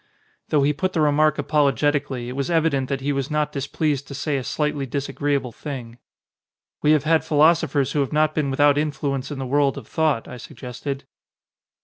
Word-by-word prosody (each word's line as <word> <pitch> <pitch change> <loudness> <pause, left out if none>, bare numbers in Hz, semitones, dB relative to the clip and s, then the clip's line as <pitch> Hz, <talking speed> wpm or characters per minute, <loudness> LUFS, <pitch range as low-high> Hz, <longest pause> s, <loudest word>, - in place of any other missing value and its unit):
Though 145 -2 +3
he 145 +2 +3
put 185 +5 -2
the 160 - +1
remark 150 0 +3
apologetically 145 -3 +1
it - - -5
was 140 +2 -2
evident 155 -6 +1
that 135 -1 -2
he 145 +2 -1
was 135 -1 -2
not 150 -1 0
displeased 145 0 -2
to 140 - -7
say 140 +1 -1
a 130 - -3
slightly 145 0 -1
disagreeable 140 0 -2
thing. 125 -4 -7 0.8
"We 150 - +2
have 150 -3 +2
had 160 +1 +3
philosophers 150 -3 +3
who 150 - 0
have 140 - 0
not 155 0 +2
been 150 -3 0
without 145 +1 +4
influence 140 -3 -2
in 145 - -5
the 135 - -4
world 140 +1 +1
of - - -8
thought," 155 -7 0
I - - -8
sug - - -12
gested. 135 +2 -5
145 Hz, 195 wpm, -23 LUFS, 135-150 Hz, 0.8 s, without